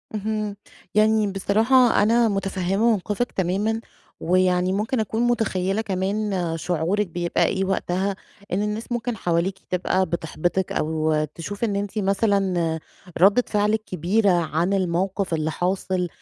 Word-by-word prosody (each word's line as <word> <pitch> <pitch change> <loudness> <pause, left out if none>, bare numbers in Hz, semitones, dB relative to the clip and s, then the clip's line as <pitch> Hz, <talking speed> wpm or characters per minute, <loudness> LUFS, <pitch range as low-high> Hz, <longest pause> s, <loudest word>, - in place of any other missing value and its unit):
اهم. 215 0 -2 0.4
يعني 215 0 +4
بصراحة 225 +5 +3
أنا 230 +2 +4
متفهمة 195 +2 0
موقفِك 210 +3 -1
تمامًا، 200 +5 -1 0.4
ويعني 180 +1 +2
ممكن 220 +5 -1
أكون 220 +1 -1
متخيلة 215 -4 0
كمان 200 +1 -1 0.3
شعورِك 180 +5 0
بيبقى 175 0 0
إيه 195 0 0
وقتها، 190 +1 -1 0.4
إن 190 - +1
الناس 210 +3 -3
ممكن 240 -1 -2
حواليكِ 180 +2 -1
تبقى 185 +1 +1
بتحبطِك 175 +2 -2
أو 155 0 0
تشوف 200 +6 -6
إن 210 -3 0
أنتِ 200 +1 -3
مثلًا 195 -5 +1 0.4
ردة 205 +6 +6
فعلِك 210 +1 +1
كبيرة 190 +4 +1
عن 170 +1 +1
الموقف 185 0 0
اللي 155 0 0
حاصل، 180 +1 -1
195 Hz, 125 wpm, -23 LUFS, 180-215 Hz, 0.4 s, ردة